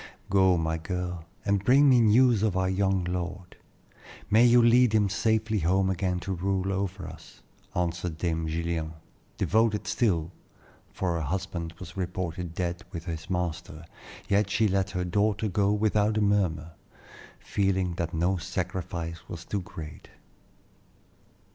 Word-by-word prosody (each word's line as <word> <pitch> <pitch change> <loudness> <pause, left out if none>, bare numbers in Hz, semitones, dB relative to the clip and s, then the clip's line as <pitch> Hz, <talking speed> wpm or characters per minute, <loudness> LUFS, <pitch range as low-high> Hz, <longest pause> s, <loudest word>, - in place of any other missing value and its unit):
"Go, 95 -2 +4
my 80 0 -1
girl, 90 -1 -4 0.2
and 100 -1 +1
bring 135 +6 +5
me 130 -3 +6
news 115 0 +5
of 105 -4 +1
our 95 0 +1
young 95 -1 +1
lord. 90 +1 -4 0.8
May 115 +3 +6
you 120 +1 +6
lead 120 0 +5
him 105 -2 +3
safely 110 +1 +1
home 95 +3 +2
again 90 0 -1
to 95 - -3
rule 95 +1 -1
over 95 -2 -3
us," 80 -1 -13 0.3
answered 85 -1 -2
Dame 80 -1 -1
Gillian, 80 0 -2 0.4
devoted 110 -1 +1
still, 105 -7 0 0.6
for 90 -2 -1
her - - -2
husband 85 0 -4
was 95 - -9
reported 90 -2 -4
dead 90 0 -2
with 85 -3 -6
his 80 -1 -6
master, 90 -2 -3 0.4
yet 100 0 +2
she 105 +2 +2
let 95 0 0
her 90 -2 -2
daughter 105 +4 +1
go 100 0 +1
without 105 0 +2
a - - +2
murmur, 90 -6 +1 0.7
feeling 95 -3 0
that 85 -1 -2
no 90 +3 +1
sacrifice 90 -2 -4
was 85 -1 -7
too 100 - -2
great. 80 -3 -9
95 Hz, 145 wpm, -27 LUFS, 85-100 Hz, 0.8 s, me